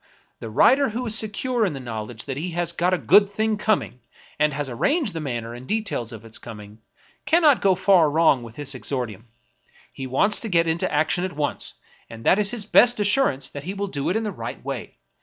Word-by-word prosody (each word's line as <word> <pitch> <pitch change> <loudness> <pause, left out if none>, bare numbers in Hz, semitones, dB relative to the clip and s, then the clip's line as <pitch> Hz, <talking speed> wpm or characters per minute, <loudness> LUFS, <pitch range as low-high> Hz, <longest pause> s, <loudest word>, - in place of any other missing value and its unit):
The - - -7
wTiter 270 - +4
who 240 +3 -4
is 220 - +1
secure 225 +3 +1
in 190 -7 0
the 135 - -6
knowledge 110 -2 -7
that 135 - -4
he 160 +6 -4
has 175 0 -1
got 175 +1 0
a 185 - +2
good 200 +3 +4
thing 220 +1 0
coming, 210 - -1 0.4
and 150 0 +3
has 145 0 -3
arranged 250 - 0
the 165 - -4
manner 120 -6 -5
and 125 +2 -10
de 220 +1 0
tails 120 - -3
of 115 -1 -10
its 110 0 -8
coming, 105 -1 -11 0.5
cannot 305 -3 +4
go 190 -2 +3
far 185 -4 +4
wrong 150 -4 +3
with 115 -1 -11
his 145 -1 -2
exordium; 125 -5 -4 0.7
he 135 -1 -6
wants 200 +11 +2
to 225 - -4
get 170 -3 +3
into 160 +1 -1
action 160 +4 +1
at 185 -3 -4
once, 150 -1 -4 0.3
and 115 0 -10
that 190 - +4
is 205 -1 +2
his 225 -3 -3
best 240 +2 +5
assurance 205 - +1
that 145 0 -8
he 190 +3 -5
will 200 0 -2
do 145 -8 -3
it 180 - -1
in 225 - 0
the 210 - -3
right - - -8
way. - - -6
170 Hz, 225 wpm, -23 LUFS, 130-210 Hz, 0.7 s, best